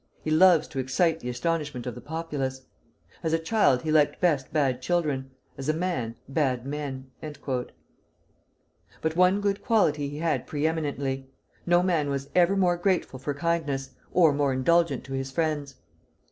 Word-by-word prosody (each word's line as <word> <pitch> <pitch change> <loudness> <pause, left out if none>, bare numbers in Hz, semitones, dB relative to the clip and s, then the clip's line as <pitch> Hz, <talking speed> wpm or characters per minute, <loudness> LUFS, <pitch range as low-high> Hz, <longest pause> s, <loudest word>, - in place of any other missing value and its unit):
he 155 - -2
loves 165 0 +6
to 135 - -5
excite 160 +6 +1
the 125 - -5
astonishment 150 -1 -2
of 125 - -3
the 125 - -10
populace. 140 -3 -4 0.6
As 160 -1 -1
a - - +4
child 160 - +2
he 155 - -1
liked 150 -2 +3
best 150 -7 +1
bad 135 -5 +1
children, 145 -4 -1 0.3
as 135 +2 -3
a - - +3
man, 160 -10 -2
bad 135 -3 0
men." 135 -2 -5
But 150 +2 -8
one 185 +3 +4
good 200 0 -1
quality 150 -10 +2
he 145 - -7
had 160 0 -1
pre 150 0 -2
eminently, 140 -4 -2 0.4
no 175 +1 +4
man 165 -6 +1
was 140 0 -3
ever 180 +2 +4
more 180 -2 +3
grateful 175 -7 0
for 140 +2 -3
kindness, 145 -4 -1 0.2
or 165 -4 +5
more 140 -1 +1
indulgent 170 +6 +2
to 135 - -8
his 135 0 -3
friends. 145 -2 -2
150 Hz, 160 wpm, -27 LUFS, 135-170 Hz, 0.6 s, loves